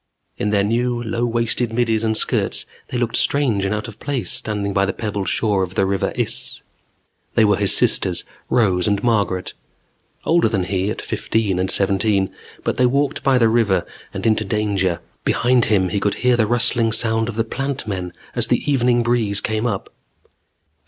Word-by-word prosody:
In 105 - 0
their 100 -1 +2
new, 120 +3 0
low 115 +2 -1
waisted 115 0 0
middies 115 -1 0
and 110 -1 +1
skirts, - - 0 0.2
they 125 - -4
looked 120 -1 -1
strange 125 -9 +1
and 100 +2 0
out 105 +2 -4
of 110 - -11
place 140 -4 -2
standing 105 -2 -1
by 95 - +2
the - - -1
pebbled 100 -5 -3
shore 105 -3 +1
of 95 0 -3
the 95 - +2
River 95 -1 -1
Iss. - - 0 0.7
They 110 - +5
were 105 -1 +4
his 100 -1 +3
sisters, - - +2 0.3
Rose 95 -6 +2
and 100 -1 0
Margaret. 100 -6 0 0.7
Older 165 -8 +3
than 100 -4 0
he 95 +1 -1
at 110 - -4
fifteen 110 -3 -1
and 95 0 0
seventeen. 100 0 +1 0.3
But - - -1
they 125 - +4
walked 140 +2 0
by 135 -2 +3
the 115 -2 +4
river 110 -6 +2 0.3
and - - -6
into 110 -1 +2
danger. 100 -4 0 0.2
Behind 125 0 +2
him 95 -4 +2
he 100 - -1
could 100 0 0
hear 125 -1 +5
the 110 -3 +2
rustling 120 -1 +1
sound 110 0 +1
of 115 - -5
the 115 - +1
Plant 135 +3 -3
Men 90 -3 -3 0.2
as - - +2
the - - 0
evening 120 -3 +2
breeze 115 -4 +1
came 110 +2 -1
up. 100 -5 -4
110 Hz, 185 wpm, -20 LUFS, 100-120 Hz, 0.7 s, They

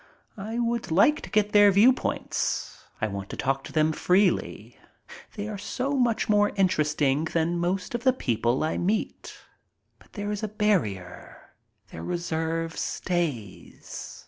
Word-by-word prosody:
I 220 +4 -4
would 235 -1 -1
like 205 - +4
to - - -9
get 210 -1 +1
their 205 -1 +7
viewpoint. 230 +7 +1 0.2
I - - 0
want 100 -1 -6
to - - -7
talk 135 0 -1
to - - -9
them 155 0 +2
freely. 185 +4 0 0.6
They 205 0 -4
are 210 -2 -5
so 255 +7 -3
much 245 -6 +1
more 205 -1 +3
interesting 150 -6 +1
than 170 +1 0
most 180 +4 -2
of 240 0 -3
the 260 - +5
people 120 - 0
I 155 - -1
meet. 205 +5 -2 0.6
But - - -23
there 205 -1 -4
is 210 - -3
a 215 - -2
barrier. 175 - -2 0.4
Their 80 - -8
reserve 165 - -2
stays. 150 - -4
180 Hz, 145 wpm, -26 LUFS, 155-210 Hz, 0.6 s, their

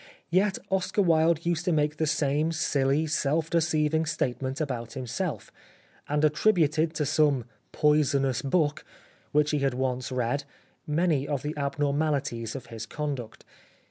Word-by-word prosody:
Yet 190 +2 +2
Oscar 190 +2 +1
Wilde 165 -1 +3
used 170 -1 0
to 180 - +2
make 150 -1 +1
the 160 - 0
same 150 +1 +1
silly, 145 -2 +1
self 155 +1 0
deceiving 160 -1 +1
state 130 -5 -1
ment 130 +1 -3
about 120 -7 -3
himself, 135 +7 -4 0.6
and 150 +1 +2
attributed 155 -1 +2
to 150 - 0
some 140 -4 +2
" - - -42
poisonous 140 -4 +3
book 145 +1 0 0.2
" - - -32
which 150 0 +3
he 150 - +1
had 135 -2 0
once 130 -1 -2
read 125 +3 -1 0.4
many 150 -2 +1
of 140 -3 -2
the 150 +1 -2
abnormalities 140 -4 -1
of 135 - -6
his 110 0 -6
conduct. 140 -6 -5
150 Hz, 150 wpm, -27 LUFS, 135-160 Hz, 0.6 s, Wilde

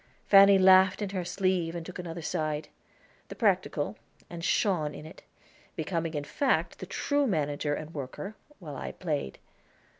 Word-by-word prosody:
Fanny 195 0 +8
laughed 190 +1 +6
in 200 - -4
her 185 -2 -2
sleeve 180 -2 0
and 170 -1 -5
took 180 - -8
another 170 -1 -6
side 155 -2 -2 0.6
the - - -9
practical, - - 0 0.3
and 170 -1 -7
shone 165 -7 +1
in - - -9
it, 160 - -12 0.5
becoming 165 -3 -2
in 145 - -2
fact 265 - 0
the - - -7
true 285 -1 0
manager 145 - -1
and 155 +2 -8
worker, 145 +9 -6 0.2
while 155 -6 -8
I - - -6
played. 150 - -3
170 Hz, 155 wpm, -29 LUFS, 155-190 Hz, 0.6 s, Fanny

